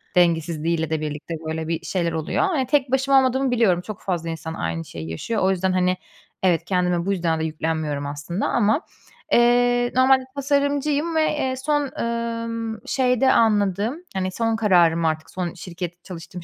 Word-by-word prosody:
dengesizliğiyle 165 -2 +1
de 160 -1 -1
birlikte 150 +2 -5
böyle 160 0 -3
bir 165 -1 -3
şeyler 170 -3 -1
oluyor. 160 - -1
Hani, 320 -10 +1
tek 265 -2 +1
başıma 270 +1 +3
olmadığımı 260 0 +2
biliyorum. 205 -8 +3
Çok 210 +1 -8
fazla 170 -3 -2
insan 160 0 -5
aynı 80 - -3
şeyi 80 -1 -7
yaşıyor. 150 - -3
O 190 - +4
yüzden, 190 0 0
hani, 185 0 +1 0.5
evet, 170 -2 +2
kendime 180 -2 0
bu 200 - 0
yüzden 170 -4 0
de 160 - -1
yüklenmiyorum 155 -2 -2
aslında 145 +7 -3
ama, 225 +5 +2 0.5
eee, 245 0 +4
normalde 260 0 +5
tasarımcıyım 285 +3 0
ve, 315 - +4 0.2
eee, 260 -2 -1
son, 290 +1 -1
emm, 230 -1 -3
şeyde 260 0 +2
anladığım, 215 - +2
hani, 185 -1 -2
son 225 +2 0
kararım 170 -6 +3
artık, 155 0 -1
son 180 -2 -3
şirket 175 -1 -7
çalıştığım 175 0 -9
190 Hz, 165 wpm, -23 LUFS, 165-245 Hz, 0.5 s, normalde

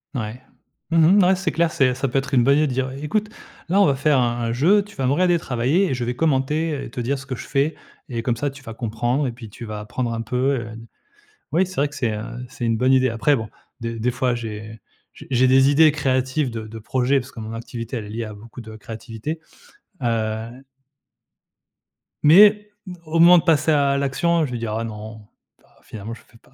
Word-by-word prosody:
Ouais, 110 0 -4 0.5
mmh 165 +4 +5
mh, - - +5
ouais, 190 +1 +4
c'est 185 -3 -2
clair, 165 +1 +1
c'est 130 -4 +2
ça 135 +1 -1
peut 135 +2 +1
être 135 0 -3
une 120 - +5
bonne 140 +2 +4
idée 155 - +2
dire: 130 0 -1
«Heu, 130 - -8
écoute, 210 +7 -1 0.4
là 195 +4 +3
on - - +6
va 140 - +2
faire 140 0 +2
un 120 -1 0
un 115 - -1
jeu, 180 - +4
tu 205 - -16
vas 130 -1 -1
me 130 - +2
regarder 175 +2 +3
travailler 140 +10 +1
et - - 0
je 125 - -3
vais 125 - -1
commenter, 150 +2 +1
heu 140 - -4
et - - -7
te 125 - -4
dire 135 +4 -1
ce 140 - -10
que 130 -1 -4
je - - -9
fais 140 +3 +1 0.4
et 120 -2 -3
comme 115 0 0
ça 145 +2 -2
tu 140 0 -14
vas 115 -2 -8
comprendre 120 +4 -1
et 125 - -1
puis 115 -2 -11
tu 120 - -9
vas 105 -1 -6
apprendre 115 +3 -3
un 115 - -3
peu, 120 +2 -3 0.2
heu, 110 -1 -8
d» 115 0 -11 0.7
oui 180 +5 +3
c'est 185 0 -11
vrai 145 +1 +2
que 145 - -12
c'est, 115 -4 -1
heu, 105 - -4 0.3
c'est 130 -2 -7
une 115 -1 +1
bonne 130 +3 +2
idée. 130 0 +4
Après 115 +5 +2
bon, 110 -5 -3 0.3
de 115 0 -3
des 120 +3 0
fois, 125 -1 0
j'ai 110 -1 -7 0.3
j - - -13
j'ai 130 0 +3
des 135 +1 +5
idées 155 +2 +6
créatives 130 -1 0
de 110 -1 -6
de 115 - -8
projet 130 +5 +1
parce 130 +2 -7
que - - -9
mon 110 0 -6
activité 115 +1 -6
elle 110 - -4
est - - -9
liée 115 +1 -4
à 110 - -8
beaucoup 115 +4 -12
de 110 -1 -10
créativité, 115 +7 -7 0.6
heu. 110 -1 -1 1.7
Mais, 210 +6 +6 0.2
mmh, 180 - -6
au 160 +1 -1
moment 175 +1 +8
de - - +2
passer 160 -1 +3
à 140 -2 +2
l'action, 160 +4 +1
je 135 - -6
vais - - -2
dire: 115 -2 -4
«Ah 115 - -2
non, 110 -1 -9 0.3
bah, - - -29
finalement, 110 +1 -8
je 115 - -12
fais 115 - -22
pas, - - -27
130 Hz, 245 wpm, -22 LUFS, 115-150 Hz, 1.7 s, moment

